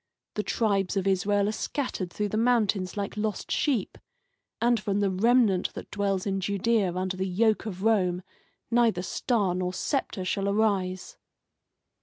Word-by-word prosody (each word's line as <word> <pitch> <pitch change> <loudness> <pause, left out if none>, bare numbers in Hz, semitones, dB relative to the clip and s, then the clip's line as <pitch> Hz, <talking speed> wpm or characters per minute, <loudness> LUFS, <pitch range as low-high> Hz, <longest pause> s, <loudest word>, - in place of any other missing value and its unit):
The 210 - -1
tribes 200 -3 0
of 195 - 0
Israel 200 +1 +2
are - - +1
scattered 220 - -3
through 210 +2 -2
the 215 - -3
mountains 215 -5 +1
like 200 -1 -3
lost 210 0 -3
sheep, 255 -10 0 0.6
and 235 0 +3
from 200 0 -1
the 200 -2 +1
remnant 210 -1 +3
that - - -8
dwells 195 -2 -1
in 195 -1 -1
Judea 200 -1 +1
under 185 0 -2
the 190 +1 -2
yoke 215 +4 +1
of 190 -2 -6
Rome 185 -5 +2 0.5
neither 230 -6 +3
star 205 -2 0
nor 180 0 -2
sceptre 200 -6 -2
shall 195 +1 0
arise." 200 -3 0
200 Hz, 155 wpm, -27 LUFS, 185-220 Hz, 0.6 s, and